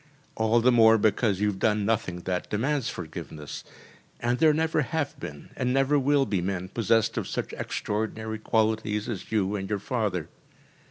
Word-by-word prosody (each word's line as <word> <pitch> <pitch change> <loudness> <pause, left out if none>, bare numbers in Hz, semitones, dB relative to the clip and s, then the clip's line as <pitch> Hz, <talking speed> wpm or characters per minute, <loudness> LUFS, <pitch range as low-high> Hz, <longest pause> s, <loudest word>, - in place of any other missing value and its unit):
All 110 +1 +2
the 125 +2 +5
more 115 -2 +6
because 105 -1 +1
you - - +3
have 95 -2 -5
done 105 -1 +2
nothing 100 -5 -1
that 90 0 -3
demands 130 +3 0
forgiveness, 80 -3 -7 0.6
and 120 +1 0
there 160 -1 +6
never 160 0 +1
have 150 0 -2
been 75 -1 -8
and 125 -1 0
never 135 +2 +3
will 140 0 +3
be 100 -7 -1
men 95 0 -3
possessed 115 0 +1
of - - -5
such - - -4
extraordinary 110 +1 -3
qualities 110 -1 0
as 110 -7 -5
you 105 -2 +1
and 95 -1 -4
your 105 - 0
father. 100 - -2
110 Hz, 170 wpm, -27 LUFS, 100-125 Hz, 0.6 s, more